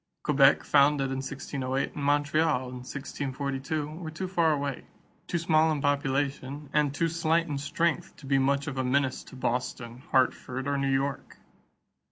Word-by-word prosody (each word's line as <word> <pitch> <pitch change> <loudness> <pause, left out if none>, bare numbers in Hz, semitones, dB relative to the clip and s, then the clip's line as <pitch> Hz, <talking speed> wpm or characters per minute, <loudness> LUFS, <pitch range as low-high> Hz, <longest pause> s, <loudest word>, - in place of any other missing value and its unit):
Quebec, 140 -2 +5
founded 140 -1 +3
in 135 - -2
1608, 135 0 -3
and 145 - -5
Montreal, 145 -1 +2
in 125 - -8
1642, 140 +2 -4
were 160 +2 -7
too 170 +4 -4
far 170 -3 +2
away, 140 -3 -2 0.4
too - - -1
small 160 -1 +3
in 150 - -1
population, 140 0 -1
and 150 -2 +3
too 165 +4 0
slight 165 0 +1
in 145 -3 -3
strength 165 +3 -1
to - - -14
be 135 0 +2
much 140 +1 +1
of 135 -2 -4
a - - +1
menace 130 +1 +1
to - - -12
Boston, 125 -1 -3
Hartford, 130 0 +1
or 140 - +1
New 140 0 0
York. 135 +1 -1
140 Hz, 165 wpm, -28 LUFS, 135-150 Hz, 0.4 s, Quebec